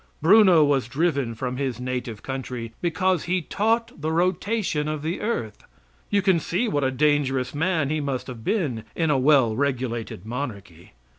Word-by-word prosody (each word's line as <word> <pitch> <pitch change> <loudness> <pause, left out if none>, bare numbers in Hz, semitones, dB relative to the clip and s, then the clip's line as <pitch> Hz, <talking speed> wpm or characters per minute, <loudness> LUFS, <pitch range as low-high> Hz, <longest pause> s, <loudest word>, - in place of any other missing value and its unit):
Bruno 185 -1 +6
was 135 -4 +1
driven 140 -4 0
from 125 +2 -4
his 130 -3 -2
native 125 -3 -4
country 125 -3 -5
because 185 +1 +1
he 185 +2 +1
taught 225 -1 -1
the 155 +1 -1
rotation 180 -1 0
of 155 -1 -3
the 165 +4 -3
earth; 165 - -3 0.5
you 200 -1 +2
can 190 -3 +3
see 180 +9 -1
what 145 -9 0
a 130 - +2
dangerous 135 -2 +1
man 160 -2 0
he 155 -1 0
must 140 -3 -3
have 120 -4 -9
been 140 - -1
in 160 -2 +1
a 140 - +2
well 130 -5 +4
regulated 125 -7 -2
monarchy. 105 - -7
145 Hz, 165 wpm, -24 LUFS, 125-175 Hz, 0.5 s, Bruno